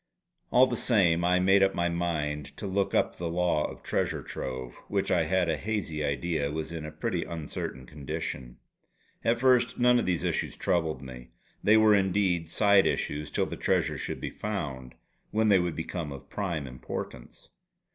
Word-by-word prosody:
All 125 +1 +6
the - - -2
same 90 -8 +3
I 90 +1 +3
made 95 +2 +5
up 95 0 +3
my 85 0 +1
mind 80 -4 -2
to - - -5
look 100 0 0
up - - +1
the 85 -1 -3
law 85 -3 +1
of - - -11
Treasure - - -1
Trove, 65 -1 -5
which 100 -1 -1
I 85 -3 +3
had 90 +2 +1
a 80 -2 0
hazy 80 -5 -2
idea 70 +1 -1
was 80 +1 -4
in 80 -2 -5
a - - -7
pretty 85 +3 -2
uncertain 75 -5 -5
condition. 65 -3 -5 0.7
At 115 +1 +2
first 125 -1 +3
none 125 0 +5
of - - -2
these 90 -3 0
issues - - -1
troubled 80 -6 0
me. 65 -2 -9 0.4
They 105 +1 +6
were 110 -1 +6
indeed 95 -4 +2
side 100 +1 +4
issues 75 0 -2
till - - 0
the - - -6
treasure - - +1
should - - -4
be - - -4
found; 70 -12 -5 0.3
when 110 0 +2
they 100 -2 +6
would 90 -2 -1
become 80 -2 -4
of 70 0 -10
prime 85 -8 -2
importance. 65 -1 -8
85 Hz, 180 wpm, -28 LUFS, 75-100 Hz, 0.7 s, All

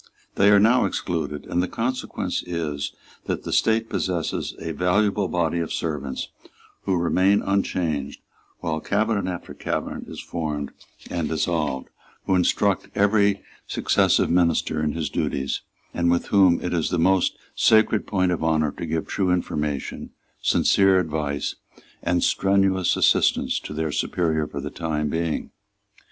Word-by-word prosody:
They 100 +1 +4
are 100 0 +7
now 115 +5 +4
excluded, 75 -4 -3
and 90 - 0
the 90 - -1
consequence 115 -6 -2
is 80 -5 -3 0.3
that - - -3
the - - -4
State 110 0 +2
possesses 90 -5 -2
a 80 - -5
valuable 100 +4 +1
body 85 -1 0
of 85 - -3
servants 75 -5 -3 0.6
who 95 -2 +1
remain 95 +4 +3
unchanged 85 -7 -1 0.4
while 80 -1 -1
cabinet 100 +2 0
after 90 - -7
cabinet - - -4
is - - -8
formed 75 -4 -4 0.4
and 85 -3 -1
dissolved, 80 -4 -1 0.4
who - - +1
instruct 95 +1 +2
every 100 -1 +3 0.2
successive - - +2
minister 85 -3 +2
in 75 -1 0
his 80 -2 -2
duties, 70 0 -2 0.3
and 85 0 +1
with 85 0 +1
whom 95 -4 +5
it 90 - -2
is 85 -3 0
the - - 0
most 95 +2 +2 0.2
sacred 110 -1 +3
point 95 -3 +1
of 85 - -2
honour 80 -2 +2
to 85 - -6
give 80 0 -1
true 95 -2 -1
information, 75 -5 -2 0.3
sincere 95 -1 +4
advise, 75 -4 -2 0.4
and 85 0 +1
strenuous 95 -1 +2
assistance - - +3
to - - -9
their 80 0 -2
superior 80 0 0
for - - -6
the - - -5
time 75 -3 -2
being. 80 +1 -2
85 Hz, 145 wpm, -24 LUFS, 80-95 Hz, 0.6 s, are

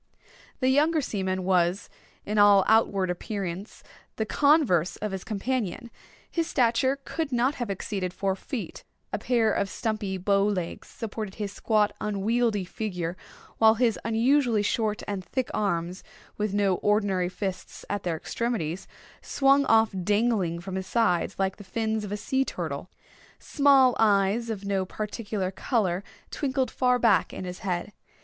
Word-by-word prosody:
The 255 - +3
younger 305 +4 +3
seaman 190 -8 -2
was, 180 +1 +1 0.4
in 210 +1 0
all 200 -2 +6
outward 200 -4 +3
appearance, 190 +1 -5 0.3
the 220 - -1
converse 270 - +3
of 210 -1 -4
his 190 -1 -5
companion. 230 +1 -3 0.4
His 335 -2 -1
stature 260 +1 +2
could 320 -3 -3
not 250 +3 +2
have 235 - -2
exceeded 195 -1 -3
four 195 +1 -1
feet. 230 +4 -6 0.3
A - - -1
pair 230 -3 +2
of 200 - 0
stumpy 210 -2 -2
bow 195 +2 +2
legs 190 -5 -2
supported 215 -3 -6
his 205 -2 -4
squat, 210 -1 +2
unwieldy 210 0 0
figure, 180 -4 -4 0.4
while 220 0 +6
his 230 -2 +1
unusually 230 0 +2
short 215 0 -1
and 200 -2 -3
thick 255 +5 -3
arms, 180 -3 -1 0.3
with 210 -1 -1
no 200 -2 +2
ordinary 200 -4 +1
fists 190 0 -6
at 205 - -2
their 170 -3 -2
extremities, 190 -4 -3 0.3
swung 275 0 +3
off 225 -1 +4
dangling 205 -4 +1
from 190 +2 -5
his 190 0 -5
sides 195 -6 +1
like 195 0 -1
the 205 - -10
fins 220 +2 -2
of 205 - -6
a 205 - -2
sea 265 +5 0
turtle. - - -5 0.5
Small 275 -3 +4
eyes, 210 +2 +3
of 205 -3 -4
no 195 -1 0
particular 205 -1 -4
color, 195 -4 0 0.3
twinkled 265 -3 -1
far 250 -1 +2
back 230 -5 +3
in - - -6
his 180 0 -6
head. 185 +2 -3
210 Hz, 150 wpm, -26 LUFS, 190-235 Hz, 0.5 s, all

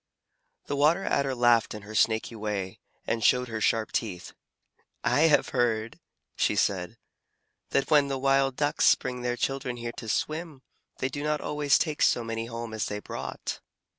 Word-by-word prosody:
The 145 - -3
Water 155 +7 +3
Adder 135 -2 0
laughed 120 -3 +3
in 105 - -8
her 105 +2 -10
snaky 110 +1 +1
way, 105 -3 -4 0.3
and 115 -1 -1
showed 125 +2 +3
her 110 -1 -4
sharp 110 0 +1
teeth. 95 -6 -3 0.7
"I 160 +3 +4
have 150 - +3
heard," 115 -3 0 0.4
she - - +1
said, 90 -3 0 0.7
"that 135 - 0
when 145 -2 +5
the 135 -1 -2
Wild 135 0 +2
Ducks 145 +1 +4
bring 125 -1 -5
their 120 0 -1
children 130 -2 -2
here 120 0 -5
to 115 - -6
swim, 155 +1 -3 0.3
they 130 - -1
do 145 +2 -5
not 150 0 0
always 150 -1 +2
take 155 -3 -2
so 120 - +3
many 115 0 -4
home 115 -1 -6
as 110 - -2
they 105 - -3
brought." 105 - -6
125 Hz, 170 wpm, -27 LUFS, 110-140 Hz, 0.7 s, when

